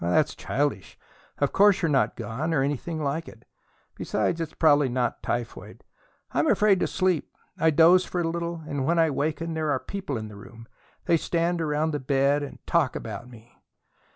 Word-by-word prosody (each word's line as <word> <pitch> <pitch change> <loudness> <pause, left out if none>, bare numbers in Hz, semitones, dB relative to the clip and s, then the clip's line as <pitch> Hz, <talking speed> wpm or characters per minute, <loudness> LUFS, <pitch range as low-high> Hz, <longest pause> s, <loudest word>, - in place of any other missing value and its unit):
"That's 140 - +2
childish. 135 - -2 0.4
Of 140 - 0
course 200 -2 +4
you're 165 - +2
not 135 - +2
gone, 125 +9 -3
or 135 - +2
anything 150 +3 -3
like 155 +4 -2
it. 115 0 -14 0.5
Besides, 170 - -1
it's 160 -2 -5
probably 145 -4 +4
not 125 -1 -1
typhoid." 120 -1 -5 0.5
"I'm - - +1
afraid 205 -3 +4
to - - +1
sleep. 185 -4 0 0.3
I 160 - +4
doze 165 +4 +6
for 180 - -4
a 165 - 0
little, 170 0 -4
and 145 -3 -2
when 170 +5 +1
I 165 -2 +3
waken 160 +4 -2
there 155 -1 -1
are 140 - +2
people 185 -8 -5
in 110 -1 -5
the 105 - -11
room. 115 +2 -13 0.4
They 170 - +3
stand 170 +1 -1
around 155 0 0
the 150 - -2
bed 140 +2 +1
and 145 - -7
talk 165 -7 +1
about 115 +2 -6
me." 120 -1 -17
150 Hz, 185 wpm, -26 LUFS, 130-165 Hz, 0.5 s, doze